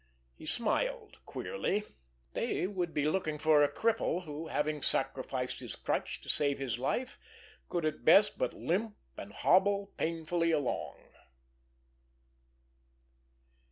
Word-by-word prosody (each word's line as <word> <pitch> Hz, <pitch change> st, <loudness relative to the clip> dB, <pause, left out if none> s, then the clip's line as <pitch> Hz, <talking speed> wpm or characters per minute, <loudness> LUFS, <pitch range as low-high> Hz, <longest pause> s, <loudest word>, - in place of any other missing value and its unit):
He 155 Hz, -, -12 dB
smiled 440 Hz, -, 0 dB
queerly. 210 Hz, -, -2 dB, 0.5 s
They -, -, -1 dB
would 180 Hz, -3 st, -2 dB
be 150 Hz, -2 st, 0 dB
looking 155 Hz, -2 st, -1 dB
for 155 Hz, -1 st, +4 dB
a 145 Hz, -, +3 dB
cripple 220 Hz, -5 st, 0 dB
who, 155 Hz, 0 st, -6 dB
having 150 Hz, -1 st, -1 dB
sacrificed -, -, -1 dB
his -, -, -5 dB
crutch -, -, -2 dB
to -, -, -15 dB
save 140 Hz, -1 st, +4 dB
his 125 Hz, -4 st, -3 dB
life, 245 Hz, -, -2 dB, 0.5 s
could 170 Hz, -3 st, -1 dB
at 155 Hz, -1 st, -2 dB
best 200 Hz, +6 st, +6 dB
but -, -, +1 dB
limp 205 Hz, +5 st, -1 dB, 0.2 s
and 100 Hz, -, -8 dB
hobble 200 Hz, -, +3 dB
painfully 165 Hz, +1 st, 0 dB
along! 145 Hz, -6 st, -1 dB
165 Hz, 125 wpm, -32 LUFS, 150-200 Hz, 0.5 s, best